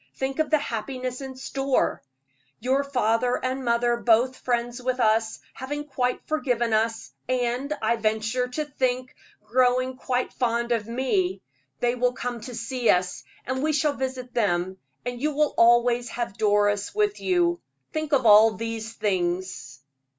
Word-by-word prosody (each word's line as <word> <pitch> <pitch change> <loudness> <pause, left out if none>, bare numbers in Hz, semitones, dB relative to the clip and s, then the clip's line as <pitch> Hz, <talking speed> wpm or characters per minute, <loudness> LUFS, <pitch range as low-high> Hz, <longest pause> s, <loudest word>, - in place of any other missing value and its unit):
Think 265 +2 -3
of 315 - +1
the 310 - +4
happiness 255 0 -4
in 265 -1 -7
store! 270 0 -1 0.6
Your 265 +4 +1
father 245 -3 +1
and 260 +1 -2
mother 240 0 +2
both 240 +2 +3
friends 240 0 -2
with 255 0 -1
us, 220 -1 +2
having 290 +3 -5
quite 250 -3 -2
forgiven 245 -7 0
us, 225 +1 0 0.2
and, 250 +2 -1
I 230 +2 +2
venture 220 +3 0
to 300 +5 -3
think, 255 -3 -2 0.3
growing 255 +2 +2
quite 255 -1 -2
fond 235 -1 0
of 225 -3 0
me; 310 - 0 0.4
they 240 0 +2
will 250 0 +1
come 245 -1 -4
to 245 +2 -7
see 235 +1 -1
us, 180 0 +2 0.2
and 260 +1 -2
we 310 +1 +1
shall 295 0 +2
visit 260 -2 -5
them; 190 -5 0 0.3
and 245 0 -4
you 300 0 0
will 300 0 +2
always 240 +1 +4
have 235 -5 -4
Doris 205 - +1
with 420 -1 +1
you. 350 -2 +1 0.3
Think 310 -1 -3
of 265 -4 +3
all 215 +1 +7
those 225 0 -4
things!" 180 -8 -2
245 Hz, 155 wpm, -25 LUFS, 225-265 Hz, 0.6 s, all